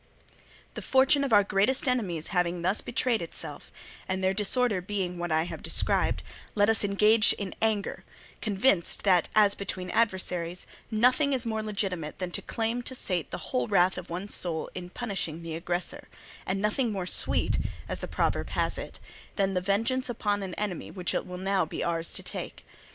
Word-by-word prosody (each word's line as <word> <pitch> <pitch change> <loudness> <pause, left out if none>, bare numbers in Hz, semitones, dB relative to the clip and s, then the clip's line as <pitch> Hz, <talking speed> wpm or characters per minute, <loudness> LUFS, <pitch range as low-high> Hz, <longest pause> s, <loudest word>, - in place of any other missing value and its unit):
"The - - -6
fortune 270 +2 +4
of 275 - -1
our 205 -2 +7
greatest 210 +8 +2
enemies 190 -11 0
having 180 -1 0
thus 185 +4 +2
betrayed 235 -3 0
itself, 165 - -6 0.4
and 190 0 -1
their 190 0 +3
disorder 210 0 +2
being 180 -2 -3
what 175 -1 -2
I 160 0 +3
have 175 - -6
described, - - +1 0.3
let 205 +1 +5
us 225 - +1
engage 210 +2 +5
in 200 -2 -4
anger, 220 -3 0 0.4
convinced 200 -3 +2
that, 180 -4 +4
as 210 -2 +6
between 185 -2 -5
adversaries, 185 -5 0 0.2
nothing 250 +6 +3
is 255 -2 0
more 220 -1 -1
legitimate 195 -7 -3
than 180 -1 -3
to - - -2
claim 230 +1 -1
to 260 +2 -5
sate 180 - -1
the - - -4 0.2
whole 125 -1 +1
wrath 180 +2 +4
of 180 0 -7
one's 185 +4 -3
soul 165 -3 -2
in 180 -1 -6
punishing 180 -7 -3
the 165 -1 -4
aggressor, 175 +2 -3 0.4
and 190 +1 0
nothing 215 +4 +1
more 190 -3 -2
sweet, - - +1 0.3
as - - -4
the - - -5
proverb - - 0
has - - -1
it, - - -8 0.4
than 195 -1 +1
the 180 - +1
vengeance 225 +7 0
upon 205 -3 0
an 190 -2 -5
enemy, 205 -5 -3
which 180 -2 -3
it - - -1
will 180 0 -6
now 195 +1 +1
be - - -4
ours 165 -1 -1
to - - -5
take. - - -6
195 Hz, 185 wpm, -28 LUFS, 180-220 Hz, 0.4 s, our